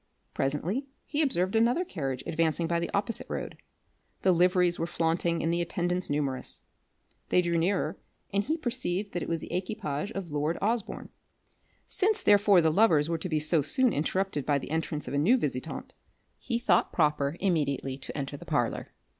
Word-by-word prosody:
Presently 175 - -1 0.2
he 295 +1 0
observed 190 - +1
another 240 +11 +3
carriage 135 - -4
advancing 165 +1 0
by 170 +1 0
the 170 - -2
opposite 205 +3 -2
road. - - -4 0.7
The 190 - +5
liveries 180 0 +3
were 165 - -1
flaunting 170 0 0
and 165 +1 +1
the 170 - +1
attendants 175 +1 -2
numerous. 140 -3 -1 0.7
They 180 - +4
drew 170 -1 0
nearer, 170 -2 0 0.3
and 200 0 +2
he 315 +7 -1
perceived 225 - -2
that 175 - -2
it - - -4
was 165 -1 -1
the - - -7
equipage 180 -4 -3
of 190 -5 -5
lord 150 +3 0
Osborne. 225 +1 -2 0.8
Since 415 +2 +1
therefore 205 -2 +6
the 160 -1 +3
lovers 160 -5 +4
were 165 -1 -1
to 180 - -4
be 155 -2 +1
so 155 +1 +2
soon 240 - +2
interrupted 165 0 -1
by 145 +1 +2
the 140 - -6
entrance 160 -2 -2
of 125 - -4
a 145 - +2
new 215 - +5
visitant, 145 - -4 0.5
he 235 - -1
thought 200 -7 +2
proper 150 -1 +1
immediately 140 -8 0
to - - -7
enter 140 0 -4
the - - -11
parlour. - - -1
170 Hz, 180 wpm, -29 LUFS, 150-200 Hz, 0.8 s, therefore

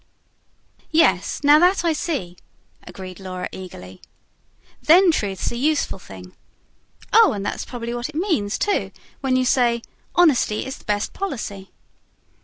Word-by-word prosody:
"Yes, 190 - +2
now 290 +1 +7
THAT 360 +1 +3
I 330 - +3
see," 275 - -3 0.5
agreed 185 +1 -9
Laura 185 -1 -5
eagerly. 95 - -10 0.8
"Then 350 +3 +6
truth's 200 - -2
a - - -5
useful 285 -5 0
thing. 90 - -12 0.8
Oh, 450 -3 +6
and 200 -1 -4
that's - - -3
probably 235 -1 -5
what 240 +2 -4
it 310 - -12
means, 310 - 0
too, 410 - 0 0.3
when 265 -2 0
you 255 0 +2
say: 240 -2 +2 0.3
Honesty 290 -11 +3
is 265 +1 -7
the - - -21
best 205 0 -1
Policy." 215 - -5
240 Hz, 140 wpm, -22 LUFS, 190-310 Hz, 0.8 s, now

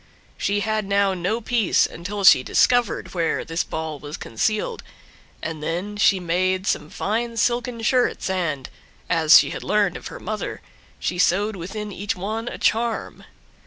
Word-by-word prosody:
She 205 +1 0
had 215 0 -1
now 200 0 +2
no 185 +5 -1
peace 230 -4 +2
until 200 +4 -5
she 180 -8 +8
discovered 245 - +2
where 170 -3 -1
this 165 +1 -1
ball 160 -2 -5
was 145 +2 -7
concealed, 215 - -2 0.6
and 160 -2 -4
then 175 +7 -3
she 205 -2 +4
made 185 +2 0
some 150 -5 -1
fine 230 +6 -2
silken 240 0 0
shirts, 250 +2 +1
and, 170 -8 -2 0.4
as 165 -2 +7
she - - +3
had - - -6
learned 205 -4 +1
of - - -9
her - - -8
mother, 215 +2 -5 0.4
she 175 - -3
sewed 200 +4 +2
within 205 +4 -6
each 200 +1 -3
one 220 +5 -4
a - - -5
charm. 230 +1 -1
200 Hz, 160 wpm, -23 LUFS, 170-220 Hz, 0.6 s, she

